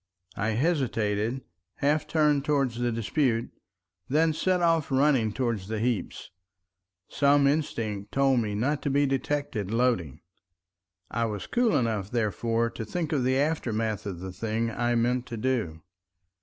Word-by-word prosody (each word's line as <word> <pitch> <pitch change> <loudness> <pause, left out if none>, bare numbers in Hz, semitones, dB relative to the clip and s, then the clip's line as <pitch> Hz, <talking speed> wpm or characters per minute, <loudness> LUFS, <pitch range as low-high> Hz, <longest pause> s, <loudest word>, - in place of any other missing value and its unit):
I 110 +2 -1
hesitated, 120 -6 0 0.3
half 150 +2 +1
turned 150 -3 +2
towards 140 -5 0
the 120 0 0
dispute, 115 +2 0 0.6
then 155 +3 +3
set 185 +3 +1
off 165 -3 +2
running 135 -5 +3
towards 115 -5 -2
the 110 +1 -3
heaps. 115 -5 -2 0.8
Some 140 0 +3
instinct 115 -9 -1
told 135 -2 +3
me 105 -3 -2
not 140 +8 0
to 145 - -1
be 140 +1 +3
detected 135 -6 -2
loading. 115 - 0 0.9
I 115 +1 0
was 105 -3 -4
cool 240 -9 +2
enough 110 -6 -1
therefore 115 +1 0
to - - -6
think 160 - -3
of 135 -4 +1
the 130 +1 +2
aftermath 115 - -1
of 90 -3 -5
the 95 -1 -6
thing 115 +3 -2
I 120 +1 0
meant 120 +2 +1
to 115 - -6
do. 105 -10 -2
120 Hz, 145 wpm, -27 LUFS, 110-140 Hz, 0.9 s, then